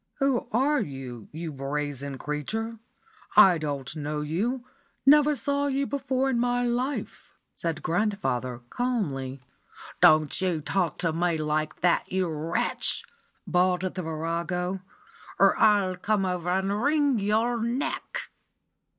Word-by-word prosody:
"Who 275 -3 +1
are 275 +5 +2
you, 130 - -7
you 160 +1 -5
brazen 140 0 -4
creature? 220 - -4 0.6
I 180 -4 +7
don't 145 -2 -4
know 150 0 -3
you 220 - -2 0.4
never 295 +1 +6
saw 285 0 0
you 275 0 0
before 270 -1 -1
in 255 -3 +1
my 245 0 +1
life," 250 +4 -3 0.2
said 165 -2 -3
grandfather, 160 - -1
calmly. 140 - -2 0.6
"Don't 155 0 +5
you 180 -4 +1
talk 175 +2 -1
to 165 - +1
me 170 0 +1
like 155 0 -2
that, 175 -1 +2
you 185 -1 +1
wretch," 155 +1 +1 0.4
bawled 180 0 +2
the 185 0 -3
virago, 170 +3 -2 0.6
"or - - +5
I'll 200 -4 +4
come 200 +1 +1
over 180 -1 -2
and 195 +3 0
wring 285 -3 +2
your 220 +4 +1
neck." 245 +7 -3
185 Hz, 125 wpm, -27 LUFS, 155-240 Hz, 0.6 s, I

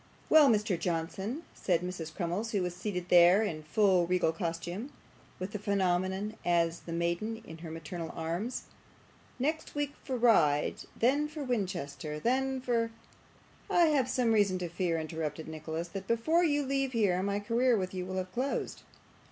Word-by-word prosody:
'Well, 310 -3 +8
Mr. 210 -5 +2
Johnson,' 190 - -2
said 175 -3 0
Mrs. 180 -3 -5
Crummles, 180 +8 -3
who 195 -3 +1
was 180 -1 -3
seated 180 -1 -4
there 180 +4 +7
in 160 -7 -3
full 180 +2 +3
regal 180 -2 +2
costume, 175 - -4 0.5
with 185 +2 -5
the 210 - -4
phenomenon 190 +1 0
as 170 -1 +2
the 170 - -9
Maiden 170 +7 -1
in 160 0 -10
her 165 0 -7
maternal 165 +1 -6
arms, 170 +9 -3 0.7
'next 310 +5 -2
week 290 -1 -1
for 260 - -2
Ryde, 160 -12 +3
then 280 +6 +2
for 300 -1 -6
Winchester, 160 - -3
then 265 +6 +1
for 235 -2 +1 0.4
' - - -29
'I 350 - +5
have 270 -4 +2
some 245 -3 +2
reason 205 -4 +3
to 180 -1 -4
fear,' 170 -1 -1
interrupted 160 0 -4
Nicholas, 160 +2 -5
'that 195 +1 -6
before 315 +10 +2
you 290 -3 +2
leave 270 -1 0
here 195 -6 +2
my 200 +1 0
career 235 +3 +2
with 185 -1 -3
you 185 -1 -3
will 185 0 -4
have 185 0 -3
closed. 255 +7 -2
190 Hz, 170 wpm, -31 LUFS, 170-235 Hz, 0.7 s, Well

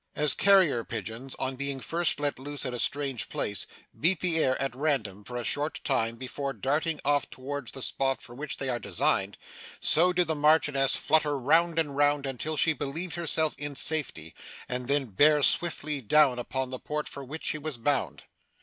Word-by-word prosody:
As 150 -1 +2
carrier 185 -12 +4
pigeons, 115 +5 -6
on 130 0 -2
being 140 0 -3
first 170 +5 0
let 145 -3 -2
loose 145 +1 -5
in 125 - -2
a 125 - -4
strange 135 -3 0
place, 100 -4 -2 0.3
beat 175 +4 +3
the 170 -3 +3
air 130 - +1
at 135 -2 -2
random 125 -9 -1
for 120 +4 -6
a 120 - -3
short 145 +5 -1
time 115 -4 0
before 135 +3 -4
darting 150 +4 -1
off 145 0 +1
towards 140 +2 -6
the 135 - -6
spot 135 -1 -1
for 120 - -10
which 140 +3 -5
they 135 - -2
are 120 -2 -1
designed, 100 -3 0 0.4
so 175 +3 +5
did 180 -1 +2
the 160 - +1
Marchioness 150 -2 +3
flutter 150 -2 +1
round 160 +5 +2
and 150 -4 0
round 145 0 +2
until 135 +4 -3
she 160 - +3
believed 155 +5 -3
herself 160 -2 +1
in 145 0 -5
safety, 135 - 0 0.3
and 125 0 -4
then 140 0 +1
bear 145 +7 +3
swiftly 155 -4 0
down 135 +1 +4
upon 130 +1 -3
the 130 - -5
port 150 0 -4
for 140 - -8
which 150 +5 -7
she 155 - +1
was 150 -3 -5
bound. 115 - 0
140 Hz, 190 wpm, -28 LUFS, 130-155 Hz, 0.4 s, so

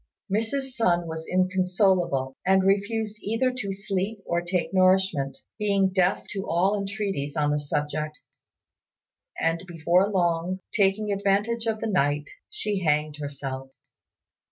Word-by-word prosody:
Mrs. 260 +6 -1
Sun 180 -9 +2
was 160 0 -6
inconsolable, 185 -6 +1
and 190 0 +4
refused 210 +2 0
either 230 +5 +1
to 230 -6 -4
sleep 200 +1 -2
or 170 0 0
take 175 +1 -2
nourishment, 185 -7 +3 0.2
being 200 -2 +2
deaf 185 0 +1
to 195 -1 -4
all 185 +5 +3
entreaties 195 -8 -3
on 145 -1 +2
the 150 - +1
subject; 150 +1 -2 1.2
and 165 0 +1
before 175 +3 +2
long, 175 -1 0
taking 205 +1 +2
advantage 205 +4 +1
of 220 -1 -1
the - - -1
night, 145 -6 +1 0.2
she 210 - -2
hanged 150 -3 +1
herself. 135 -2 -5
185 Hz, 130 wpm, -26 LUFS, 160-205 Hz, 1.2 s, and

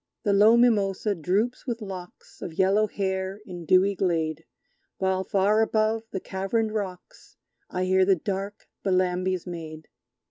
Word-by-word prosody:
The 205 -3 +2
low 215 +4 +6
mimosa 210 -4 +2
droops 200 - -1
with 235 -2 -2
locks 190 -4 -10
Of 160 - -7
yellow 195 +3 +3
hair, 190 -1 -3
in 175 -3 -8
dewy 185 +3 +4
glade, 165 -4 -1 0.5
While 190 0 0
far 200 +3 +2
above 220 0 +1
the 190 - -4
caverned 195 +4 -2
rocks 195 -4 -7 0.3
I 185 0 -2
hear 190 0 +3
the 190 0 +4
dark 195 +3 -5 0.2
Bellambi's 185 -1 0
Maid! 160 -3 -8
190 Hz, 140 wpm, -26 LUFS, 185-210 Hz, 0.5 s, low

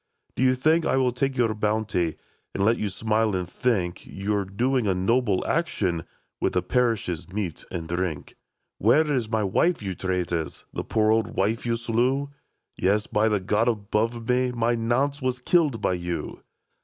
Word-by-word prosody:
" - - -45
Do - - -3
you 130 0 +4
think 160 +6 +3
I - - +1
will 130 -2 +3
take 135 +2 -1
your 115 -3 +2
bounty, 105 -6 0 0.4
And 100 - +1
let 115 +2 +3
you 105 - -1
smile 110 +1 0
and 90 -1 -2
think 90 -3 -1
You 100 +2 -3
're 100 -1 0
doing 120 +5 0
a 95 - +2
noble 105 +1 +1
action 95 - 0 0.3
With - - 0
the - - +1
parish's 115 -9 0
meat 95 -5 -4
and 85 -3 -5
drink? 85 -2 -3 0.4
Where 120 +10 +4
is 130 -7 -1
my 110 -1 +1
wife, 115 - +1
you 95 -2 -2
traitors 90 -3 -2
— - - -46
The - - -3
poor 110 -1 +2
old 110 0 +1
wife 110 +5 0
you 115 0 +1
slew? 125 +5 0 0.4
Yes, 100 +3 +1
by 110 +1 +2
the 105 -2 +1
God 105 +5 +1
above 115 +1 -1
us, 125 0 +2
My 120 0 +2
Nance 125 +5 0
was 130 -1 -1
killed 145 -3 +2
by - - +1
you 85 -1 -4
110 Hz, 185 wpm, -25 LUFS, 95-125 Hz, 0.4 s, you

